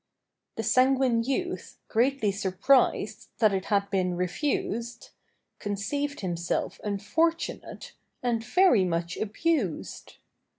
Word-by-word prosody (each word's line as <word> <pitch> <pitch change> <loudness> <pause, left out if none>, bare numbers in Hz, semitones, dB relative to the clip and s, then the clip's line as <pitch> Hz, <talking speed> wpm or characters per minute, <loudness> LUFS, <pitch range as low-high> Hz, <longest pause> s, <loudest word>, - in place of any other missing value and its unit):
The - - -3
sanguine 255 -2 +3
youth, 275 +9 -3
greatly 240 -2 +2
surprised 200 +7 +1
That 215 -4 +4
it 190 0 -1
had 200 -1 +1
been 185 -2 +1
refused, 235 - -2 0.5
Conceived 280 +9 -3
himself 175 -2 -2
unfortunate 320 +12 -2 0.3
And 235 -2 0
very 245 - +4
much 170 0 -1
abused. 220 - -2
225 Hz, 95 wpm, -27 LUFS, 195-275 Hz, 0.5 s, That